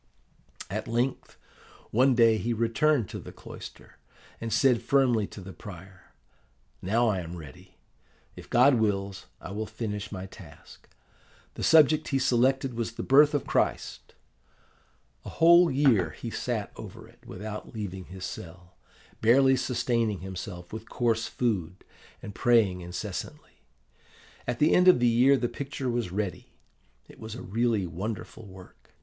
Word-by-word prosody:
"At - - -4
length, 120 +3 -2 0.5
one 130 +3 +4
day 115 -2 +4
he 120 +2 -1
returned 115 +2 +1
to - - -6
the - - -10
cloister, - - -12 0.4
and 115 0 -5
said 125 -2 +3
firmly 125 -7 +2
to 100 - -11
the 95 +1 -10
prior, 95 -2 -13 0.7
'Now 115 +5 +1
I 100 -4 +1
am 85 0 -7
ready. 75 -5 -13 0.6
If - - -12
God 125 +1 +5
wills, 100 -3 -2
I - - -9
will 105 +2 -4
finish 105 -2 -5
my 95 -2 -6
task.' 90 -6 -15 0.6
The - - -8
subject 155 -1 +5
he 135 - 0
selected 130 +1 +2
was 115 -1 -3
the - - -5
Birth 145 +3 +5
of 145 - -1
Christ. - - -2 1.1
A - - -8
whole 170 +1 +6
year 130 - +3
he - - -8
sat - - -3
over - - -10
it, - - -21
without 105 +2 -7
leaving 95 -4 -5
his 95 0 -8
cell, 90 0 -9 0.5
barely 130 +4 +5
sustaining 120 -5 -1
himself 95 -1 -8
with 110 0 -8
coarse 115 -2 0
food, 95 -7 -2 0.4
and 105 - -7
praying 110 -7 +2
incessantly. 90 +1 -7 0.9
At 120 0 -1
the 150 +4 +3
end 180 +1 +4
of 180 - +7
the 120 - +3
year 125 +4 +5
the 120 - -1
picture 135 -1 -4
was 120 -6 -2
ready. 100 -1 -4 0.5
It - - -16
was 110 0 -7
a 125 - -8
really 115 -1 0
wonderful 100 +5 -6
work. 95 -1 -16
115 Hz, 150 wpm, -27 LUFS, 95-125 Hz, 1.1 s, of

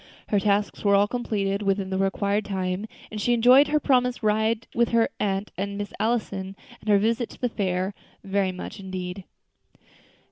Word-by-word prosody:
Her 205 - +3
tasks 205 +1 0
were 200 -1 +4
all 200 +1 +4
completed 205 -4 -1
within 195 -1 0
the 190 - -1
required 200 +2 +1
time, 190 +1 -2 0.2
and 215 -1 -4
she 240 - +2
enjoyed 250 +5 +6
her 300 +1 +2
promised 250 -4 +1
ride 220 +1 +1
with 235 -1 +2
her 230 -1 +3
aunt 200 0 -1
and 200 +1 -3
Miss 205 0 -5
Allison, 200 -4 -1 0.2
and 215 - -7
her 205 - +6
visit 230 +3 0
to - - -14
the 245 - 0
fair, 190 -2 -1 0.3
very 195 -1 0
much 185 - -8
indeed. 185 -1 -6
205 Hz, 175 wpm, -25 LUFS, 195-225 Hz, 0.3 s, enjoyed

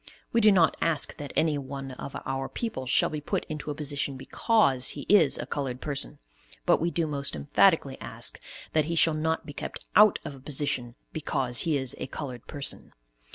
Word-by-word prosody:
We 230 - +4
do 215 -1 +7
not 175 -5 +4
ask 160 -4 +2
that 145 -2 -6
anyone 140 -3 -1
of 135 +2 -8
our 135 0 -2
people 175 - -4
shall 125 - +3
be 155 -1 -4
put - - -2
into 155 -1 -5
a 145 - -3
position 140 -2 -2
because 135 - +2
he - - -4
is 170 -9 +5
a - - -4
colored 130 -3 -3
person, 140 -1 -4 0.5
but - - +4
we 170 - +1
do 170 0 0
most 140 - -3
emphatically 70 -1 +3
ask - - -5 0.3
that 155 -2 +3
he 170 +2 -2
shall 165 -1 +5
not 160 +1 -1
be 145 - -8
kept - - -6
out 210 -1 +7
of - - -5
a 135 - -12
position 130 -3 0 0.2
because 130 -5 0
he 150 - +3
is 130 -2 0
a - - -4
colored 130 -4 -7
person. 140 -1 -6
145 Hz, 195 wpm, -27 LUFS, 135-160 Hz, 0.5 s, do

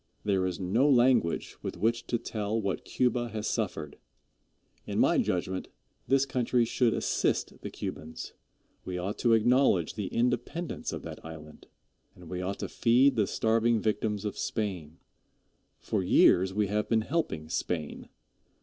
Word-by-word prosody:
There 95 -3 +1
is 90 -2 -4
no 110 +10 +2
language 125 -9 +3
with - - -5
which 115 +5 0
to 120 - +1
tell 110 -1 -2
what 100 -3 -2
Cuba 125 -1 0
has 110 -1 -4
suffered. 90 -10 -3 0.9
In - - -3
my - - +4
judgment, 95 +1 -1 0.4
this 135 +1 +3
country 125 -2 +1
should 120 +1 +2
assist - - -1
the - - -5
Cubans. 80 +1 -7 0.5
We 90 -1 -4
ought 95 +4 -4
to 120 -2 +3
acknowledge 115 - +3
the 105 -3 -4
independence 125 - -2
of - - -6
that - - -8
island, 75 -1 -11 0.5
and 90 -2 -13
we 90 0 -3
ought 95 +2 -3
to - - -2
feed 125 +4 +3
the 105 -4 +2
starving 115 +2 +2
victims 105 -1 -1
of 105 - -4
Spain. 90 -7 -3 0.8
For 105 - -1
years 95 0 +5
we 105 +2 +1
have 105 +2 -1
been 115 -1 +3
helping 110 - -2
Spain. 80 -2 -3
105 Hz, 150 wpm, -29 LUFS, 90-120 Hz, 0.9 s, years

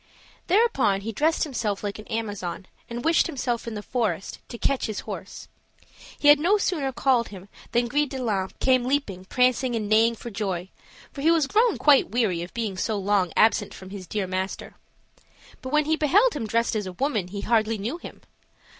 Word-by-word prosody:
Thereupon, 345 - +3
he 225 +3 -4
dressed 310 +8 +1
himself 220 -9 -2
like 205 0 -4
an 215 - -11
Amazon, 205 -5 -4 0.2
and 240 +1 -5
wished 330 0 +4
himself 250 -7 -3
in 230 - -4
the 210 - -6
forest, 205 -8 -2
to 235 - -7
catch 275 +2 0
his 215 - -4
horse. - - -8 0.7
He 290 - +4
had 290 0 +8
no 370 +7 +3
sooner 310 -9 -1
called 250 -2 +2
him 195 -1 -11 0.2
than 240 0 +2
Gris 290 +4 +1
de 270 - -5
line 205 -7 -1
came 255 -2 +3
leaping, 250 -9 -1
prancing, 250 +2 +1
and 215 -2 -2
neighing 225 +2 +4
for 235 +1 -8
joy, 190 -3 -3 0.4
for 275 - -7
he 315 - +3
was 330 -3 +4
grown 440 - +2
quite 290 -3 +5
weary 210 -7 0
of 175 - -7
being 220 -5 -3
so 215 +3 -1
long 195 -3 +1
absent 215 -2 +3
from 190 0 -11
his 195 -3 -8
dear 205 -3 -2
master; 185 +1 -4 0.9
but 260 - -6
when 300 0 +3
he 315 +1 +2
beheld 390 - +3
him 230 -7 -3
dressed 230 +2 0
as 210 -3 -2
a 185 - -6
woman 215 -3 -1
he 200 +2 -6
hardly 225 0 +1
knew 235 - -4
him. - - -11
230 Hz, 200 wpm, -25 LUFS, 200-275 Hz, 0.9 s, had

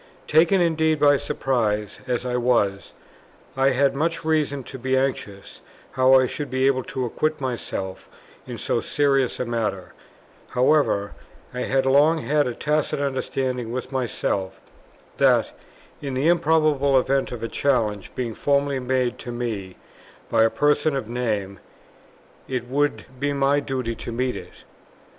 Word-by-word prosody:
Taken 170 +5 +4
indeed 160 -2 +2
by 145 -1 +5
surprise, 105 -7 -1
as 125 0 -1
I 125 -1 -1
was, 115 -6 +1 0.6
I 135 +1 +3
had 135 +1 +2
much 160 +3 -2
reason 150 -4 0
to 130 +2 -9
be 130 +2 0
anxious 120 -7 -3 0.3
how 130 0 +5
I 130 - +3
should 145 +3 -5
be 130 +1 0
able 130 -1 +2
to 130 -1 -3
acquit 155 +6 -1
myself 115 -7 -5 0.4
in - - -6
so - - -1
serious 140 -3 +1
a 125 - -1
matter; 110 -6 -3 0.6
however, 125 -6 +2 0.4
I 125 - -3
had 135 0 +1
long 145 +5 +4
had 150 -2 +1
a 120 - -4
tacit 150 -1 0
understanding 130 -3 -2
with 125 +2 -5
myself, 115 -7 -2 0.6
that, - - +3 0.5
in 140 -2 -4
the 140 +6 +2
improbable 155 -5 +3
event 135 +1 0
of 120 -2 -6
a - - -1
challenge 110 -8 0
being 120 -3 -3
formally 140 +2 +1
made 125 -1 -1
to 120 - -7
me, 110 -6 -4 0.6
by 115 - +4
a 115 - +5
person 145 +3 +1
of 135 -5 -3
name, 105 -5 -2 0.9
it 125 -2 -3
would 145 +3 0
be 145 +1 0
my 140 +1 +2
duty 130 -4 -3
to 115 - -7
meet 125 +2 -1
it. - - -11
130 Hz, 150 wpm, -23 LUFS, 120-145 Hz, 0.9 s, by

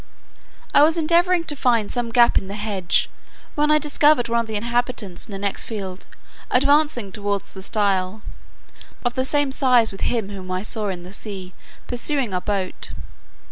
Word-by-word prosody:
I - - +7
was 320 +3 +4
endeavouring 340 +2 +3
to 305 -3 -1
find 235 -6 +1
some 240 -2 -1
gap 235 0 +4
in 190 - -10
the 200 - -6
hedge, 205 -4 0 0.5
when 300 0 +1
I 305 - +6
discovered 300 -3 +3
one 235 0 +2
of 230 - -2
the 220 - -5
inhabitants 235 -4 -2
in - - -11
the 195 - -5
next 200 0 -2
field, 195 -4 -6 0.4
advancing 280 -5 +2
towards 200 0 -3
the 190 - -9
stile, 200 0 0 0.8
of 240 - +1
the 260 - 0
same 290 +1 +1
size 250 -4 +4
with 195 - -10
him 225 -5 -1
whom 190 -2 -8
I 185 +1 -2
saw 215 -1 -2
in 180 -3 -4
the 180 +2 -11
sea 190 -3 -7 0.3
pursuing 245 -2 -1
our 180 - -1
boat. 195 -2 -2
225 Hz, 180 wpm, -22 LUFS, 195-265 Hz, 0.8 s, I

